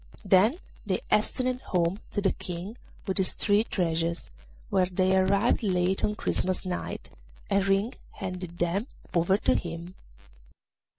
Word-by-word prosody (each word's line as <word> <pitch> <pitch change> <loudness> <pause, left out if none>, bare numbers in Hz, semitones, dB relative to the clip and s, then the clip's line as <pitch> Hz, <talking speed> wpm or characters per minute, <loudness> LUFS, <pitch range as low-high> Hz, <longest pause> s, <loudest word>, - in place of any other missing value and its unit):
Then 210 - +5 0.3
they - - -1
hastened 255 -1 +1
home 175 +2 0
to 205 - 0
the 195 - +3
King 180 +5 -6 0.3
with 190 0 -1
his 190 - +1
three 205 0 +3
treasures, 170 -4 -1 0.4
where 185 -1 +3
they 185 +1 +2
arrived 200 +4 +3
late 185 -2 +1
on 210 - +1
Christmas 185 -3 0
night, 180 -1 -4 0.4
and 200 0 +4
Ring 195 +5 +2 0.2
handed 180 -3 -6
them 180 +7 0 0.3
over 175 +3 +3
to - - +2
him. 170 +1 -4
190 Hz, 135 wpm, -28 LUFS, 180-200 Hz, 0.4 s, Then